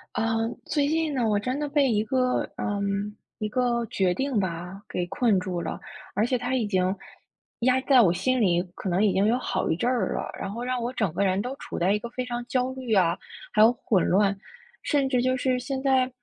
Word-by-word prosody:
呃， 225 0 0 0.2
最 290 -2 +1
近 315 0 0
呢， 245 -4 +1
我 210 -1 +2
真 255 +7 -2
的 295 - -1
被 280 -3 +2
一 210 -1 +2
个 255 -1 +1 0.2
呃， 205 -1 -2 0.6
一 215 - -2
个 240 0 0
决 185 -3 +1
定 265 +3 0
吧 180 +1 -4
给 180 - -2
困 205 +2 +2
住 180 -2 -3
了， - - -4 0.4
而 210 +3 +2
且 250 +1 +1
它 245 +2 -2
已 240 -4 +1
经 190 -2 +1 0.6
压 255 +2 +3
在 265 -1 +5
我 185 -8 +5
心 255 +7 +1
里 175 -5 +3
可 - - -6
能 185 +3 +2
已 205 - +4
经 195 - +2
有 235 - +3
好 255 - -2
一 160 - +2
阵 235 +9 0
儿 235 -7 0
了， - - -3
然 - - -4
后 230 +4 -5
让 250 0 -1
我 240 +2 -3
整 215 -9 0
个 200 +4 +1
人 190 +1 +1
都 250 +5 -4
处 - - -7
在 180 +3 +2
一 210 - +2
个 235 - -7
非 255 - -3
常 240 -1 -4
焦 255 +1 0
虑 260 -3 -3
啊 180 -3 +3 0.3
还 215 - +3
有 225 +2 +7
混 215 -5 +1
乱， 200 +1 +3 0.5
甚 280 -3 +1
至 250 -2 +2
就 255 +1 +2
是 255 0 0
现 265 +1 -4
在 260 -2 +3
235 Hz, 250 characters per minute, -26 LUFS, 195-255 Hz, 0.6 s, 有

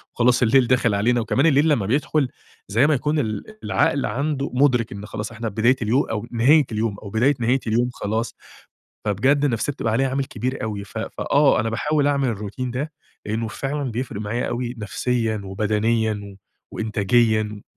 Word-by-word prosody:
وخلاص 125 +1 +3
الليل 125 +2 +4
داخل 125 -4 +2
علينا، 120 +4 +2
وكمان 130 +6 +1
الليل 150 0 +4
لمّا 120 -10 +2
بيدخل 140 +4 +1 0.4
زي 115 +8 +3
ما 155 - +3
يكون 150 +3 0
ال 110 -6 -2 0.2
العقل 145 -2 +1
عنده 140 +4 -2
مُدرِك 125 -4 +2
إن 100 +1 -7
خلاص 105 +1 -5
إحنا 115 0 -4
بداية 115 +5 +3
اليو 115 +5 +2
أو 115 +1 -4
نهاية 135 +6 +5
اليوم 110 -1 -1
أو 105 - -9
بداية 120 +7 +2
نهاية 120 +3 +2
اليوم 120 +3 +2
خلاص، 110 +2 -3 0.7
فبجد 130 +8 +2
النفسية 135 +1 0
بتبقى 115 -4 -2
عليها 135 +4 +2
عامل 135 +1 -1
كبير 130 +1 -4
أوي، 105 -2 -4
ف - - -8
ف - - -6
آه، 140 -5 +3
أنا 115 +1 -1
باحاول 145 +5 0
أعمل 140 -2 +2
الروتين 110 +3 -4
ده 140 +6 -4 0.3
لأنه 110 +2 -2
فعلًا 140 +3 -3
بيفرِق 115 -3 -4
معايا 115 +4 -2
أوي 120 0 -3
نفسيًا 110 +1 -1
وبدنيًا 110 +3 0
و 100 -1 -11 0.4
وإنتاجيًا 110 0 +1
120 Hz, 175 wpm, -22 LUFS, 110-135 Hz, 0.7 s, نهاية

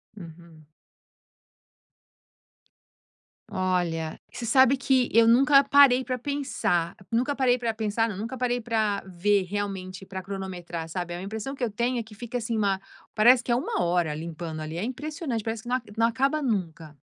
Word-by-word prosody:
Uhum. 165 -4 -13 2.8
Olha, 180 -5 -1
você 240 - -6
sabe 260 +3 +5
que 260 -2 +2
eu 230 0 +6
nunca 275 +4 +6
parei 275 -2 +6
pra 255 0 -3
pensar, 250 -11 -1 0.2
nunca 245 +5 +1
parei 255 -3 +2
pra 235 -2 -2
pensar 220 +1 0
não, 200 - -6
nunca 230 +6 -5
parei 245 0 0
pra 220 -4 0
ver 195 +2 +1
realmente, 190 -1 -5
pra 190 0 -6
cronometrar 180 -4 -6
sabe? 175 +1 -4
A 175 - -5
impressão 220 +7 -5
que 270 - -5
eu 235 - 0
tenho 240 +4 -1
é 235 - -2
que 220 0 -15
fica, 240 +3 -5
assim, 230 0 -2
uma 195 -2 +1 0.3
parece 240 +3 +6
que 240 - -3
é - - +4
1 245 - -1
hora 170 -3 +1
limpando 160 0 -6
ali, 155 +1 -6
é 175 - -2
impressionante, 265 -1 -4
parece 225 0 -3
que 240 - -8
não 250 - +2
aca 230 -5 -12
não 230 0 +4
acaba 275 +6 0
nunca. 165 - -3
220 Hz, 170 wpm, -26 LUFS, 180-250 Hz, 2.8 s, eu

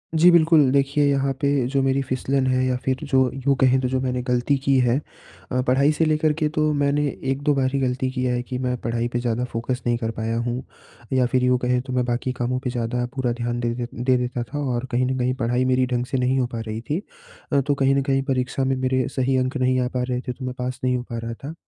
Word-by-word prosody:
जी, 170 +3 +7
बिल्कुल 160 -4 +5
देखिए 140 +1 +2
यहाँ 140 0 +1
पे 140 - +2 0.2
जो 135 - +3
मेरी 135 +1 +1
फिसलन 130 +1 0
है 130 0 +2
या 130 -1 +1
फिर 130 -1 +1
जो 135 -2 +3
यूँ 135 +1 +1
कहें 130 0 +4
तो 125 - 0
जो 130 0 0
मैंने 125 -1 -1
गलती 125 +3 +2
की 140 - +2
है 120 +3 +3 0.5
अ, 130 0 +1
पढ़ाई 140 +4 +4
से 160 +1 +1
लेकर 155 0 +2
के 150 - +3
तो 155 0 +3
मैंने 145 +1 +2 0.3
1-2 145 +2 +1
बार 130 -1 +1
ही 140 - +1
गलती 130 0 0
की 130 -1 -3
है 125 -1 0
कि 125 0 -5
मैं 125 -1 -1
पढ़ाई 120 0 -2
पे 120 - +1
ज़्यादा 120 0 -1
फोकस 120 +2 -3
नहीं 120 0 +2
कर 115 -1 -2
पाया 115 +1 -1
हूँ 120 +2 -2 0.5
या 130 -1 +3
फिर 130 -1 +2
यूँ 125 0 +3
कहें 125 0 +1
तो 130 -1 -7
मैं 125 - +2
बाकी 120 +1 -1
कामों 125 +1 0
पे 125 - -1
ज़्यादा 120 0 -2
पूरा 130 -3 0
ध्यान 120 0 -3
दे 120 - 0
दे 120 -1 -3
दे 125 +2 +1
देता 125 -1 -2
था 145 +4 -6
और 120 +2 -2
कहीं 125 +1 +2
न 130 0 -1
कहीं 125 +1 +1
पढ़ाई 125 +2 +1
मेरी 130 0 +2
ढंग 120 0 0
से 135 - -2
नहीं 130 +1 +1
हो 125 - +1
पा - - -3
रही 110 +1 -4
थी 165 +6 0 0.5
अ, 140 - +4
तो 145 +1 0
कहीं 135 0 +2
न 140 - +2
कहीं 135 0 +3
परीक्षा 130 +1 -1
में 135 - +1
मेरे 130 -1 0
सही 130 0 +1
अंक 130 +3 0
नहीं 130 0 +2
आ 125 - 0
पा 125 - +1
रहे 125 - 0
थे - - 0
तो 130 +1 -8
मैं 125 - -3
पास 125 +1 -3
नहीं 125 0 +2
हो 120 - -4
पा 115 - -3
रहा 115 0 -5
था। 155 - -5
130 Hz, 265 wpm, -23 LUFS, 125-135 Hz, 0.5 s, जी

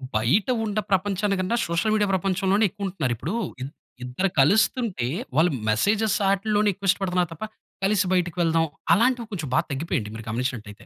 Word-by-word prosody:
బయట 120 - +2 0.2
ఉన్న 210 0 -1
ప్రపంచాన్ని 200 +1 +1
కన్నా 185 +5 0
సోషల్‌మీడియా 205 +5 +1
ప్రపంచంలోనే 190 +3 +1
ఎక్కువ 200 +2 -6
ఉంటున్నారు. 155 -10 -2
ఇప్పుడు 150 - -4 0.3
ఇద్ 135 +2 -5 0.3
ఇద్దరు 125 +10 -1
కలుస్తుంటే 200 - +2 0.3
వాళ్ళు 165 +4 +4 0.2
మెసేజ్‌స్ 205 - +2
వాటిల్లోనే 205 +1 +2 0.2
ఇష్టపడుతున్నారు 180 -2 +1
తప్పా, 215 +7 -6 0.4
కలిసి 200 0 +2
బయటకి 175 -1 0
వెళ్దాం 165 -1 +2 0.3
అలాంటివి 240 +2 +2
కొంచెం 160 -9 -4
బాగా 165 - +2
తగ్గిపోయింది 135 -6 -2
మీరు 110 - -7
గమనించినట్లయితే. 115 -3 -4
185 Hz, 145 wpm, -24 LUFS, 150-205 Hz, 0.4 s, వాళ్ళు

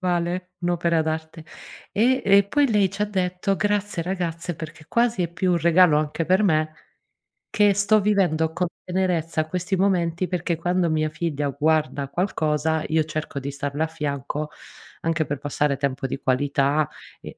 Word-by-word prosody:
carnevale, 180 0 -1
un'opera 170 -2 +1
d'arte. 160 +1 -4 0.5
E 250 +5 +2
e 200 0 +6
poi 275 +7 +2
lei 205 -3 +3
ci 200 +2 -3
ha 210 - +1
detto: 190 0 -1
"Grazie 205 -4 0
ragazze, 175 -2 -3
perché 155 -1 -9
quasi 235 -5 +1
è 170 - -1
più 180 +1 +1
un 175 - +3
regalo 170 -2 +5
anche 155 +2 -2
per 185 +4 +3
me, 155 -4 +1 0.8
che 205 -1 +4
sto 205 +2 +3
vivendo 180 -6 +2
con 180 +1 0 0.2
tenerezza 170 -4 0
questi 180 +3 -2
momenti, 180 -2 +1
perché 175 -2 -1
quando 175 +1 +1
mia 155 -1 +1
figlia 150 -3 -2
guarda 150 0 0
qualcosa 160 -2 0
io 160 0 +2
cerco 155 -2 -4
di 140 +1 -5
starle 145 +2 -2
a 160 - 0
fianco, 150 -1 -4 0.5
anche 165 -1 0
per 145 -1 -3
passare 145 0 0
tempo 140 0 -2
di 135 - -4
qualità, 140 +2 +1 0.3
e - - -10
165 Hz, 160 wpm, -23 LUFS, 155-185 Hz, 0.8 s, e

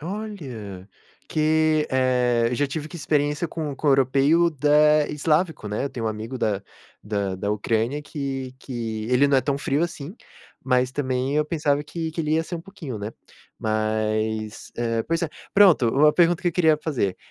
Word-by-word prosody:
Olha, 140 - -7 0.4
que, 155 0 +2
eh, 125 -2 +2
eu - - -1
já 145 +4 +1
tive 150 +2 -5
que 175 - -9
experiência 150 0 0
com 155 -3 -4
com 150 - -4
o - - +6
europeu 140 +6 +4
da 150 0 +4
eslávico, 155 - 0
né, 105 +5 -2
eu 140 - -3
tenho 120 -4 -4
um - - +2
amigo 110 +4 -5
da 105 -4 0 0.4
da 100 -2 -2
da 100 +2 -2
Ucrânia 115 +6 0
que 135 -3 -5
que 115 -5 -5
ele 125 +3 +4
não 140 - +4
é - - +4
tão 140 +1 -1
frio 140 +2 0
assim, 165 0 -4 0.5
mas, 125 0 +2
também, 130 0 -1
eu 150 - +3
pensava 150 -2 0
que 165 +1 -4
que 165 - -3
ele 155 -1 -1
ia 160 - +2
ser 170 +2 -6
um 170 - -4
pouquinho, 165 - -8
né. 105 +2 -5 0.5
Mas, 110 0 -2
eh, 115 -1 0
pois 165 0 -1
é, 170 - 0 0.3
pronto. 185 - +6
Uma 150 +6 +4
pergunta 175 0 +3
que 175 - +2
eu - - -3
queria 160 -2 +4
fazer, 125 - -1
140 Hz, 185 wpm, -24 LUFS, 115-155 Hz, 0.5 s, o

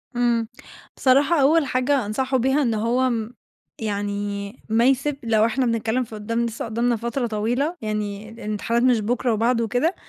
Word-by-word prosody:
إمم. 235 -2 +1 0.5
بصراحة 280 +4 +4
أول 305 +3 +4
حاجة 255 -1 +1
أنصحه 260 +6 0
بيها 265 +4 +2
إن 240 -5 +1
هو 235 +4 +1
م 230 -2 -2 0.5
يعني 205 -1 -3 0.2
ما 225 +2 +3
يسب 270 +2 +2
لو 220 -2 +3
احنا 255 +3 0
بنتكلم 230 +1 0
في 225 -2 -10
قدّام 230 +3 -2
لسه 230 -1 -4
قدّامنا 235 +2 0
فترة 235 +2 -2
طويلة، 240 +10 -1
يعني 210 -1 -4
الامتحانات 225 +1 -2
مش 250 -3 +4
بكرة 240 +2 0
وبعده 230 +2 +1
وكده، 250 - 0
235 Hz, 160 wpm, -23 LUFS, 215-255 Hz, 0.5 s, بصراحة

